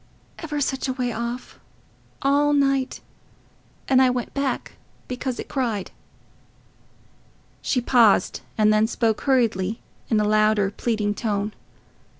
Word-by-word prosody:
ever 300 -3 -4
such 270 -1 -1
a 260 - -1
way 250 -1 -2
off... 235 +2 -5 0.6
all 290 +1 +3
night... 275 -2 +1 0.9
and 260 -1 +5
I 260 - +5
went 250 -1 -3
back 275 -2 -3 0.3
because 255 0 -4
it - - -5
cried." 230 -8 -2 1.7
She 250 - 0
paused, 230 -6 +3 0.2
and 215 -1 +4
then 215 +1 +3
spoke 225 -2 0
hurriedly 225 -6 +1 0.3
in 220 - +3
a - - +2
louder, 215 -2 +3
pleading 210 -2 -1
tone. 205 -1 -2
240 Hz, 125 wpm, -23 LUFS, 215-265 Hz, 1.7 s, and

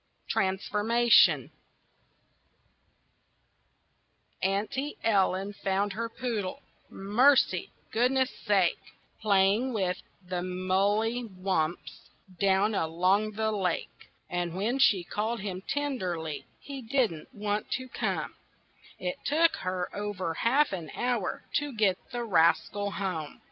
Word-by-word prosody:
TRANSFORMATION 210 +5 +3 2.9
Auntie 215 +9 -1
Ellen 195 -2 +2
found 200 +1 -1
her 230 +2 -3
poodle 230 0 -4 0.3
Mercy! 245 +8 +3 0.2
Goodness 255 +3 +2
sake! 195 -5 +2 0.4
Playing 210 +4 +3
with 185 -4 -1 0.3
the 180 -1 -2
mully 200 +6 0
wumps 185 -4 -3 0.3
Down 200 +2 +3
along 185 +5 +1
the 220 +1 0
lake. 190 -5 -3 0.2
And 175 -1 -2
when 225 +8 0
she 200 -9 +5
called 215 +5 -2
him 190 -2 -4
tenderly 185 - -2
He 275 -2 -8
didn't 230 - -1
want 210 -2 -2
to 260 -1 -3
come; - - -2 0.6
It 270 +1 -3
took 325 +3 +3
her 185 -1 -3
over 205 -5 -3
half 260 - +2
an 170 -4 -5
hour 240 -6 -1
To 290 0 -2
get 200 -4 +2
the 240 -1 -3
rascal 200 +1 +2
home. 185 -6 -4
205 Hz, 105 wpm, -29 LUFS, 185-235 Hz, 2.9 s, she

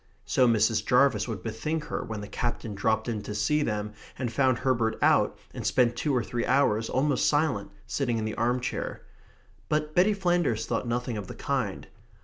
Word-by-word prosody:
so 125 - +3
Mrs. 110 -1 +3
Jarvis 125 -4 +3
would 105 -6 -5
bethink 150 +8 -3
her - - -4
when 110 -2 -5
the 105 - -7
Captain 120 -2 -3
dropped 110 +3 0
in 110 -3 -2
to 105 - -6
see 150 +8 +1
them 105 -5 -2 0.2
and 120 -3 -3
found 130 -1 +3
Herbert 115 -4 0
out, - - +3 0.2
and - - -6
spent 120 -2 +2
two 145 +4 -1
or 120 - +1
three 120 +1 -3
hours, 115 -5 +2
almost 140 +1 +1
silent, 145 -9 +1 0.2
sitting 125 -1 -1
in 110 - -2
the 110 - -3
arm 120 +2 +1
chair. 125 - -4 0.7
But 150 0 0
Betty 195 +5 +4
Flanders 175 - +1
thought - - -2
nothing 120 -1 -2
of 100 -3 -5
the - - -8
kind. 130 -9 -2
120 Hz, 190 wpm, -27 LUFS, 110-140 Hz, 0.7 s, Betty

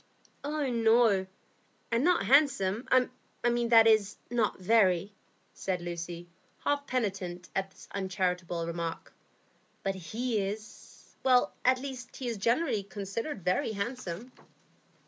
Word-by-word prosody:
"Oh 295 0 -1
no; 225 -5 +4 0.6
and 230 +2 +2
not 355 +1 +3
handsome,—that 240 -2 +3
is, 215 -2 +3
not 235 -3 +1
very," 195 -1 +3 0.4
said 185 -2 -2
Lucy, 175 0 -6 0.4
half 285 -1 0
penitent 190 -7 -2
at 195 0 0
this - - -16
uncharitable 180 -3 -1
remark. 170 0 -4 0.7
"But 195 - 0
he 215 +6 -2
is—at 245 +5 0
least 260 -2 -7
he 260 - -5
is 230 -2 -2
generally 235 +2 +1
considered 200 - -5
very 185 +4 +1
handsome." 220 0 -4
215 Hz, 105 wpm, -30 LUFS, 185-245 Hz, 0.7 s, no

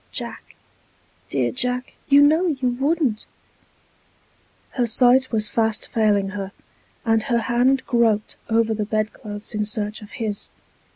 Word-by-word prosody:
Jack, - - -6 0.7
dear - - 0
Jack, 250 -1 -2 0.2
you 285 0 +7
know 315 +5 +4
you 265 -6 0
wouldn't!" 270 -2 0 1.4
Her 245 -3 0
sight 255 +3 +4
was 215 -2 +1
fast 220 0 0
failing 205 -3 +2
her, 195 0 -6 0.5
and 225 -1 +3
her 235 +1 +1
hand 255 +3 +2
groped 225 -3 +1
over 225 0 +2
the 215 -1 -2
bed 215 0 -1
clothes 205 +1 -7
in 210 0 0
search 210 +1 -3
of 210 - -11
his. 215 -3 -4
225 Hz, 135 wpm, -22 LUFS, 215-255 Hz, 1.4 s, you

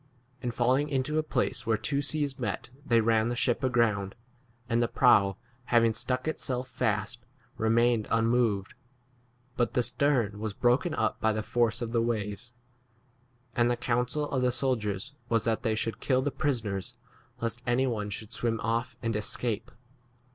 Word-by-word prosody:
And 125 -2 -2
falling 130 +5 +2
into 145 +2 0
a - - +3
place 125 -5 -1
where 110 -1 +3
two 140 +6 -1
seas 145 -1 -1
met - - -3
they 115 -5 +3
ran 110 0 +2
the 120 - -1
ship 120 +1 +1
aground, 110 -6 +1 0.5
and 120 -1 +1
the 120 - +2
prow 100 -7 +4 0.3
having 115 -2 +4
stuck 125 +4 -2
itself 130 -5 -2
fast 110 +2 -2 0.3
remained 115 0 +2
unmoved, 115 -3 +1 0.8
but 120 - 0
the 125 - +3
stern 120 -4 +1
was 110 -2 -4
broken 130 +8 +2
up - - 0
by 110 - +3
the 110 0 -2
force 120 +1 +1
of 115 - -4
the 115 -1 +2
4f - - 0
waves. 110 +1 -3 1.0
And 120 0 +3
[the] 120 - +1
counsel 125 +5 0
of 130 - 0
the 125 0 +3
soldiers 120 -2 -1 0.2
was 115 -2 +2
that 115 -1 0
they 110 -1 0
should 115 +1 -2
kill 130 -1 +1
the 145 - 0
prisoners 115 -9 -2 0.4
lest 115 +1 -2
any 120 +2 +3
one 105 -5 -2
should 105 +1 -6
43 - - -7
swim 115 -1 0
off 115 +1 -1
and 115 -1 0
escape. 105 +1 -1
120 Hz, 170 wpm, -29 LUFS, 110-125 Hz, 1.0 s, prow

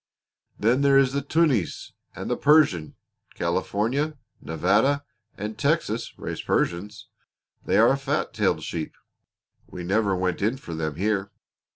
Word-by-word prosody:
Then 120 +5 +2
there 140 -1 +5
is 135 -1 +4
the 140 - 0
Tunis 140 - 0 0.2
and - - -6
the - - 0
Persian. 145 - +3 0.4
California, 115 - -1 0.2
Nevada, 100 - +1 0.3
and 105 +1 -5
Texas 140 -5 -1
raise - - -5
Persians. 100 +5 -2 0.6
They - - +2
are 115 +3 +6
a 135 - +1
fat 140 +2 -2
tailed - - +1
sheep. 80 -2 -5 0.7
We 90 - -8
never 100 +2 +1
went 90 -1 -1
in 110 +6 +1
for 85 -10 -8
them 80 -2 -3
here. 100 +1 -1
110 Hz, 140 wpm, -25 LUFS, 90-140 Hz, 0.7 s, are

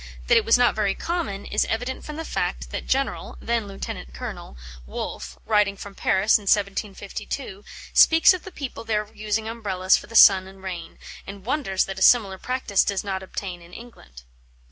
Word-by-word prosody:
That - - +4
it - - +2
was 225 - +5
not 245 0 +4
very 205 -2 0
common, 225 - -3
is 210 - +1
evident 245 +4 -3
from 300 - -7
the 325 +1 -5
fact - - -3
that - - -5
General 270 +1 -1
(then 230 -2 -1
Lieut. 195 0 -6 0.3
Colonel) 60 0 -7 0.3
Wolfe, - - -6
writing 210 -2 +2
from 200 0 -9
Paris 195 +3 +2
in - - -13
1752, 200 +2 -2 0.3
speaks 325 +3 +7
of 365 - -4
the 380 - -9
people 275 -8 -7
there 215 -2 -1
using 215 0 -2
Umbrellas 195 -5 +1
for - - -10
the 230 - -11
sun 190 -4 +8
and 190 0 -15
rain, 180 -3 -7 0.3
and 195 0 -9
wonders 245 -8 0
that 190 -1 -6
a - - -11
similar 195 -6 +5
practice 250 -6 0
does 200 -1 -2
not 190 -2 -3
obtain 185 -1 -6
in 170 +1 -16
England. 65 - -13
205 Hz, 185 wpm, -24 LUFS, 190-235 Hz, 0.3 s, sun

